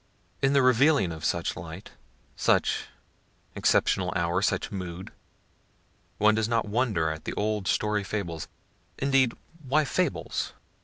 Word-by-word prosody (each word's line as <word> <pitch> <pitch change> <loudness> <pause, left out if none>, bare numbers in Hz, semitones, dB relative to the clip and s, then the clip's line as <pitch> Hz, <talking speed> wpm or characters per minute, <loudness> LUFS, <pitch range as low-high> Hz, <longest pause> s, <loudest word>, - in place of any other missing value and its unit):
In 135 0 +3
the 140 -2 +4
revealings 130 - +4
of 80 -1 -9
such 85 +1 0
light, - - -9 0.4
such - - +2 0.7
exceptional - - +2
hour, 85 +2 +1
such 100 -1 0
mood, 90 -2 -6 1.1
one 105 +1 +5
does 110 0 +1
not 115 -1 +1
wonder 105 -8 +1
at 80 0 -7
the - - -3
old 105 -2 -1
story 105 -1 +1
fables, 95 -5 -4 0.5
(indeed, 135 -3 +3 0.3
why 150 +4 +3
fables?) 180 +2 -1
105 Hz, 125 wpm, -27 LUFS, 90-130 Hz, 1.1 s, one